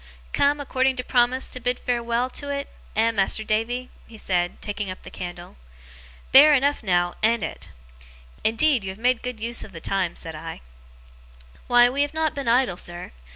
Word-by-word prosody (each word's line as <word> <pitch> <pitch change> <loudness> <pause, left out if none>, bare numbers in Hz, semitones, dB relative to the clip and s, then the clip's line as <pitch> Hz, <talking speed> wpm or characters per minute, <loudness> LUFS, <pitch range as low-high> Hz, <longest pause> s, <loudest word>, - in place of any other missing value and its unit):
'Come, 285 +1 +2
according 265 -2 +1
to 250 - -3
promise, 250 +1 +2
to 255 - -5
bid 245 0 -1
farewell 235 0 -1
to 285 - -4 0.2
't, - - -23 0.3
eh, 225 +2 +3
Mas'r 215 0 +1
Davy?' 240 +4 -1 0.2
he 225 - -13
said, 180 -4 -1
taking 205 -1 -4
up 185 - -8
the - - -10
candle. 175 - -8 0.7
'Bare 295 +3 +9
enough, 285 +2 +1
now, 175 -4 +1
an't 225 0 +2
it?' 85 - -6 0.7
'Indeed 235 +2 +2
you 190 - -4
have 190 - -7
made 245 +1 +1
good 250 -2 -5
use 230 +2 -2
of 195 - -12
the 165 - -7
time,' 185 0 -1
said 165 - -7
I. 160 +1 -8 1.1
'Why, 245 0 +7
we 270 +3 0
have 290 +2 -1
not 315 -1 +1
been 280 -3 -5
idle, 235 -6 +3
sir. 175 0 -6
235 Hz, 185 wpm, -24 LUFS, 195-255 Hz, 1.1 s, Bare